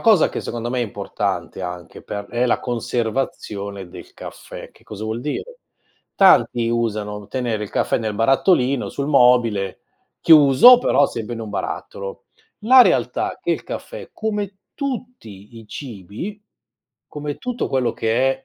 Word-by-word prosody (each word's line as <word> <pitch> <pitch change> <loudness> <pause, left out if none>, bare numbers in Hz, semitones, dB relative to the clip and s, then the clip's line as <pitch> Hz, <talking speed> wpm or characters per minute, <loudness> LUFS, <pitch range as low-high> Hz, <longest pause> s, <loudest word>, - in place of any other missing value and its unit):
cosa 215 -8 +5
che - - -5
secondo 120 0 -5
me 125 0 -1
è - - +1
importante, 100 -3 -4
anche 90 -1 -7
per 100 0 -6
è 120 +4 -1
la 125 - +2
conservazione 110 -5 -3
del - - -12
caffè. - - -10
Che - - -23
cosa 110 0 -8
vuol 110 +2 -3
dire? 440 - -5 0.6
Tanti 120 - +4
usano 105 -3 -2
tenere 120 -3 -2
il 105 - -6
caffè - - 0
nel 110 -2 -3
barattolino 135 - +2
sul 140 - -4
mobile 120 -8 +3 0.4
chiuso, 155 - +8
però 145 - +3
sempre 115 +1 -5
in 115 - -7
un 110 - -7
barattolo. 100 -1 -5 0.4
La 255 +3 +8
realtà - - 0
è - - -25
che - - -2
il - - -3
caffè, - - -8
come 210 -3 -3 0.2
tutti 235 - -7
i 110 - -14
cibi, 120 - -7 0.7
come 150 -1 -6
tutto 250 -1 -3
quello 130 -3 0
che 130 +4 0
120 Hz, 150 wpm, -21 LUFS, 105-150 Hz, 0.7 s, chiuso